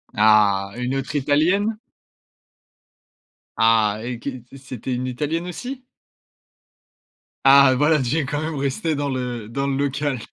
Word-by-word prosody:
Ah! 105 Hz, -2 st, +4 dB
Une 125 Hz, +2 st, -2 dB
autre 135 Hz, +2 st, -4 dB
Italienne? 170 Hz, +10 st, +1 dB, 1.8 s
Ah! 110 Hz, -2 st, +3 dB
Et 120 Hz, -1 st, -5 dB
que 140 Hz, -, -4 dB, 0.3 s
c'était 130 Hz, -2 st, -6 dB
une 125 Hz, +1 st, -3 dB
Italienne 155 Hz, +7 st, -3 dB
aussi? 250 Hz, +9 st, -7 dB, 1.6 s
Ah, 135 Hz, -1 st, +7 dB
voilà! 150 Hz, +3 st, +3 dB
Tu 140 Hz, +6 st, -1 dB
es, 150 Hz, -, 0 dB
quand 145 Hz, +1 st, -2 dB
même 160 Hz, 0 st, -3 dB
resté 140 Hz, +3 st, -2 dB
dans 145 Hz, -1 st, -2 dB
le 125 Hz, -4 st, -4 dB
dans 140 Hz, +3 st, -2 dB
le 140 Hz, -, -1 dB
local 140 Hz, -1 st, -1 dB
135 Hz, 135 wpm, -22 LUFS, 120-150 Hz, 1.8 s, Ah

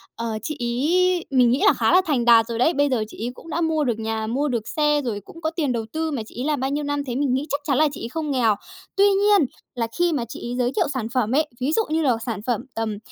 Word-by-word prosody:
ờ, 230 Hz, -, -4 dB, 0.2 s
chị 305 Hz, +8 st, -4 dB
ấy 335 Hz, +9 st, +1 dB
mình 250 Hz, -2 st, +4 dB
nghĩ 260 Hz, -, +2 dB
là -, -, +7 dB
khá -, -, +1 dB
là 370 Hz, -, +6 dB
thành 270 Hz, -7 st, 0 dB
đạt 230 Hz, -2 st, +7 dB
rồi 230 Hz, -1 st, -3 dB
đấy, 315 Hz, +7 st, +3 dB
bây 285 Hz, 0 st, +2 dB
giờ 235 Hz, -4 st, +1 dB
chị 220 Hz, +1 st, -7 dB
ấy -, -, -2 dB
cũng 330 Hz, -, -13 dB
đã 330 Hz, +2 st, -1 dB
mua 320 Hz, -2 st, +1 dB
được 240 Hz, -5 st, -1 dB
nhà, 220 Hz, 0 st, -2 dB
mua 270 Hz, +6 st, 0 dB
được 235 Hz, -5 st, -2 dB
xe, 295 Hz, -1 st, +1 dB
rồi 230 Hz, -6 st, -3 dB
cũng 330 Hz, -, -13 dB
có 315 Hz, -, 0 dB
tiền 310 Hz, -6 st, -1 dB
đầu 230 Hz, -2 st, -2 dB
tư. 320 Hz, 0 st, -1 dB
Mà 270 Hz, -6 st, -2 dB
chị -, -, -16 dB
ấy 265 Hz, -, -2 dB
làm 300 Hz, -3 st, 0 dB
bao 265 Hz, -, -1 dB
nhiêu 290 Hz, +2 st, -2 dB
năm 290 Hz, 0 st, -1 dB
thế 245 Hz, -3 st, -4 dB
mình 275 Hz, -2 st, +1 dB
nghĩ 270 Hz, +3 st, 0 dB
chắc 285 Hz, +1 st, -1 dB
chắn 280 Hz, -3 st, +1 dB
là 310 Hz, +1 st, +5 dB
chị 280 Hz, -, -8 dB
ấy 230 Hz, -, -4 dB
không 305 Hz, 0 st, -3 dB
nghèo, 230 Hz, -5 st, +3 dB, 0.4 s
tuy 395 Hz, -, +5 dB
nhiên 400 Hz, -4 st, +4 dB, 0.3 s
là 230 Hz, -2 st, -1 dB
khi 350 Hz, -1 st, +3 dB
mà 260 Hz, -6 st, -1 dB
chị -, -, -7 dB
ấy -, -, -3 dB
giới 250 Hz, -1 st, +1 dB
thiệu -, -, +2 dB
sản 250 Hz, -5 st, -2 dB
phẩm 240 Hz, -3 st, +1 dB
ấy, 305 Hz, +1 st, +2 dB
ví 265 Hz, +4 st, +1 dB
dụ 445 Hz, +7 st, +2 dB
như 320 Hz, +1 st, +1 dB
là 275 Hz, -, +3 dB
một 230 Hz, -, +1 dB
sản 230 Hz, -4 st, -3 dB
phẩm 240 Hz, -4 st, 0 dB
tầm 220 Hz, -2 st, -3 dB
275 Hz, 305 wpm, -23 LUFS, 235-310 Hz, 0.4 s, là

